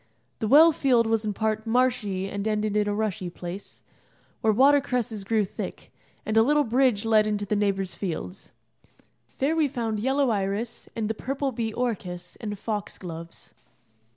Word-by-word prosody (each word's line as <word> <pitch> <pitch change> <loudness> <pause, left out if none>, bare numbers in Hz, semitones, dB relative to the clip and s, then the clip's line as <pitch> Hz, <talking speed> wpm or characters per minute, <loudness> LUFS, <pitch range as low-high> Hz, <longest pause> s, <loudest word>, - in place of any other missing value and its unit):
The 220 - -1
well 310 +7 +8
field 255 -6 +3
was 225 -1 0
in 210 - -1
part 220 +1 -1
marshy 225 -6 +1
and 200 +1 -3
ended 215 -1 0
in 210 -1 +2
a 205 - 0
rushy 205 -4 -2
place, 175 +3 -9 0.6
where 220 - +4
water 275 +6 +5
cresses 240 -6 -2
grew 215 +1 +1
thick, - - -7 0.3
and 215 - -1
a 225 - +7
little 295 +5 +3
bridge 245 -3 +2
led 215 -1 +4
into 205 -1 -1
the 210 - 0
neighbour's 195 -2 0
fields. 185 0 -5 0.9
There 285 +4 +1
we 315 -2 +3
found 230 -5 -2
yellow 265 +2 +2
iris, 205 +3 -2
and 225 -2 -1
the 220 - -1
purple 270 +4 -2
bee 225 -2 -2
orchis, 180 -7 -4
and 210 -2 -5
fox 210 0 -4
gloves. 170 -2 -9
220 Hz, 170 wpm, -26 LUFS, 200-245 Hz, 0.9 s, well